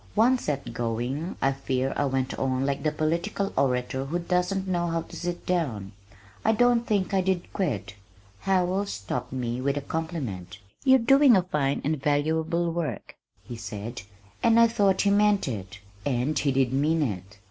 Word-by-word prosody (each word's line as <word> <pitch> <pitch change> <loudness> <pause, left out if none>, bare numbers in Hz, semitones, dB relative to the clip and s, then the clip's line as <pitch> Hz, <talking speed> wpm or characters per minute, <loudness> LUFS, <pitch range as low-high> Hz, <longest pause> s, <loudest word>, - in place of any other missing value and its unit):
Once 250 +3 +3
set 140 -5 -3
going 120 +8 -3
I 135 - +4
fear 135 -1 -1
I - - +1
went 130 -1 -1
on 130 0 0
like 140 0 -1
the 155 - +1
political 170 +6 -1
orator 130 0 0
who 160 +6 -2
doesn't 180 +2 0
know 175 -2 0
how 165 -1 -1
to - - -12
sit 175 0 -4
down. 125 - -1 0.5
I 220 - +3
don't 240 +1 +3
think 200 -2 0
I 190 - +3
did 185 -1 -2
quit. 105 - -2 0.5
Howells 190 +1 +1
stopped 100 -1 -4
me 125 -1 -3
with 140 +2 0
a - - -1
compliment. 135 - -4 0.3
"You're 265 0 +6
doing 265 0 +6
a 185 - +2
fine 150 -6 -1
and 150 -1 -1
valuable 160 +4 +1
work," 155 - -4 0.3
he 120 - -8
said, 115 +1 -6 0.4
and 230 0 +5
I 230 - +7
thought 200 -4 +2
he 200 - +3
meant 205 -2 +3
it 100 -5 -5 0.3
and 130 +3 0
he 140 - +1
did 130 -1 +1
mean 155 +4 +2
it. 100 -4 -5
155 Hz, 175 wpm, -26 LUFS, 130-185 Hz, 0.5 s, I